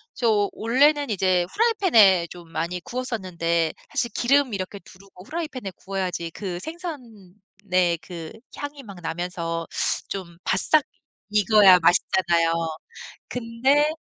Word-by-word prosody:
저 215 -4 +2
원래는 285 +5 +2
이제 185 -3 +2
후라이팬에 235 - +4
좀 170 -2 -12
많이 170 +3 -3
구웠었는데 180 -10 -2 0.2
사실 235 - -1
기름 270 0 +2
이렇게 195 +1 -4
두르고 190 -1 -16
후라이팬에 295 - -5
구워야지 185 -3 -4
그 185 -1 -5
생선의 200 - -4
그 165 -1 -8 0.3
향이 290 0 -6
막 200 -6 -11
나면서 165 0 -4 0.4
좀 175 -3 -6
바싹 290 +10 +3 0.5
익어야 205 -3 +6
맛있잖아요. 170 -1 +2 0.8
근데 250 +5 +1
195 Hz, 265 characters per minute, -24 LUFS, 175-250 Hz, 0.8 s, 익어야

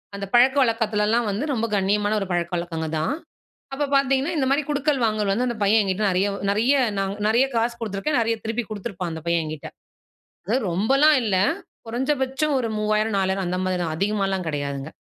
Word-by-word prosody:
அந்த 200 0 -4
பழக்க 255 +3 +5
வழக்கத்துலலாம் 225 -1 +1
வந்து, 210 +7 -2
ரொம்ப 230 -2 -1
கண்ணியமான 205 +2 +1
ஒரு - - -1
பழக்க 170 -1 -1
வழக்கங்க 165 -2 -4
தான். 155 - 0 0.6
அப்ப 280 +2 -1
பார்த்தீங்கன்னா, 275 +3 +2
இந்த 265 - +1
மாரி 280 +2 +2
குடுக்கல் 290 -1 +1
வாங்கல் 215 -2 0
வந்து 240 +5 +1
அந்த 240 - -2
பையன் 215 +2 +4
என்கிட்ட 195 +2 -1
நெறைய 190 +3 +1 0.2
நெறைய, 220 +7 +3 0.2
நான் 195 0 -1
நெறைய 235 +5 +4
காசு 230 +1 +1
குடுத்துருக்கேன். 225 +6 -2
நெறைய 230 0 +1
திருப்பி 225 +2 -2
குடுத்துருப்பான் 195 -4 -5
அந்த 160 - -6
பையன் 170 -1 +2
என்கிட்டே. 155 -1 -6 0.8
அது 225 +5 +2
ரொம்பலாம் 270 - +4
இல்ல. 205 -4 +1 0.5
குறைஞ்சபட்சம் 265 +4 -1
ஒரு 235 -3 -2
3000, 215 0 0
4000 190 0 0
அந்த 180 +1 -1
மாரி 185 -1 0
தான். 160 -2 -2
அதிகமாலாம் 195 -1 -1
கெடையாதுங்க. 140 -1 -4
215 Hz, 175 wpm, -23 LUFS, 190-245 Hz, 0.8 s, பழக்க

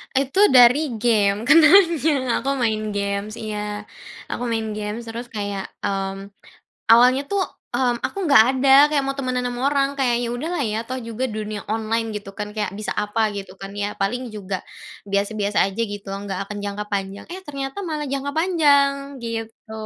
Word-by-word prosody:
Itu 270 +6 +1 0.2
dari 250 +2 +6
game 210 -2 +2
kenalnya. 315 -4 +5
Aku 275 +3 -1
main 215 -4 -1
games 200 +1 -2
iya. 210 -2 -5 0.5
Aku - - -3
main 225 -2 -2
games, 210 +2 -4
terus 235 +2 -6
kayak 205 -4 -4 0.2
mmm, 195 0 -3 0.6
awalnya 250 +4 +6
tuh 400 -1 +2 0.3
mmm, 245 -2 +1
aku - - -6
enggak 280 -6 +8
ada 265 +1 +1 0.2
kayak 285 -2 +2
mau 275 0 -2
temenan 255 -2 -1
sama 245 0 -5
orang. 275 -1 +2
Kayaknya 245 -2 +1
udah 295 +7 -4
lah 320 - -1
ya 215 -2 -1
toh 255 +1 -4
juga 230 +2 -3
dunia 215 -2 -5
online, 225 +1 -1
gitu 205 -1 -7
kan, 210 0 -4
kayak 210 -3 -2
bisa 215 - -3
apa 210 +2 -1
gitu 195 -2 -7
kan 195 0 -7
ya. 205 0 -3
Paling 240 +5 -2
juga, 195 -2 -5 0.4
biasa-biasa 200 +1 0
aja 195 +4 -4
gitu, 205 -1 -6
enggak 195 -1 -5
akan 210 - -6
jangka 205 +1 -4
panjang. 195 0 -3
Eh, 375 - -7
ternyata 275 +3 -5
malah 305 -2 -3
jangka 275 +1 -2
panjang, 285 -5 +2
gitu. 225 -1 -6
230 Hz, 170 wpm, -22 LUFS, 205-270 Hz, 0.6 s, enggak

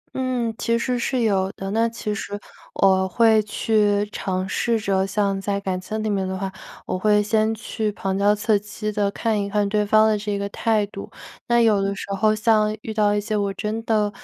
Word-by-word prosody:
嗯， 250 -3 -1
其 230 0 +1
实 245 +1 -1
是 255 +1 -1
有 195 -3 +1
的， 195 0 -6
那 230 +2 +2
其 215 -2 -4
实 205 0 -5 0.4
我 190 -1 +3
会 220 +2 +4
去 210 -1 +1
尝 185 -2 -2
试 230 +3 0
着 195 -2 0
像 195 -1 0
在 200 0 -1
感 185 -2 -3
情 215 +3 -4
里 - - -1
面 195 -2 0
的 190 0 -3
话， 190 0 -3 0.3
我 185 - -3
会 210 0 +3
先 220 +1 +1
去 215 0 -3
旁 195 -1 -3
敲 205 +1 +4
侧 215 +1 +1
击 215 +1 -5
地 205 -1 0
看 215 0 -1
一 200 - -3
看 205 0 +1
对 210 +1 +1
方 215 +1 +4
的 215 - +3
这 205 -1 -3
个 200 0 -2
态 215 -1 +1
度。 200 0 -9 0.4
那 235 0 +3
有 215 -3 +4
的 195 0 -1
时 - - -6
候 215 +2 +2
像 215 -1 +2
遇 220 - -5
到 210 -1 +2
一 - - +1
些 215 +1 -3
我 200 -1 0
真 220 +2 -3
的 210 -2 +1
210 Hz, 230 characters per minute, -22 LUFS, 200-220 Hz, 0.4 s, 会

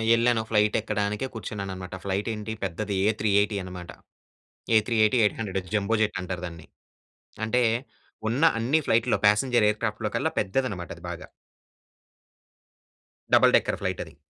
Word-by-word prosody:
ఎళ్ళాను, 115 0 +2
ఫ్లైటెక్కడానికే 105 +1 0
కూర్చున్నాననమాట. 95 -5 -6
ఫ్లైటేంటి, 105 +3 -3
పెద్దది 100 +2 -3 0.2
ఏ380 105 -1 +1
అనమాట. 90 -1 -8 0.9
ఏ380-800 110 -4 +1
జంబో 105 +2 +1
జెట్ 105 -2 0
అంటారు 90 -1 -5
దాన్ని. 85 -2 -11 0.8
అంటే, 125 +3 +2 0.7
ఉన్న 130 +7 0
అన్ని 125 +8 +2
ఫ్లైటుల్లో, 115 +1 +2
ప్యాసింజర్ 110 +1 +3
ఎయిర్‌క్రాఫ్ట్‌లో 105 0 -2
కల్లా 160 - 0
పెద్దదనమాట 100 -5 -2
అది 85 - -16
బాగా. 85 - -7 2.1
Double - - +6
decker - - -2
ఫ్లైటది. - - -4
105 Hz, 105 wpm, -26 LUFS, 100-115 Hz, 2.1 s, Double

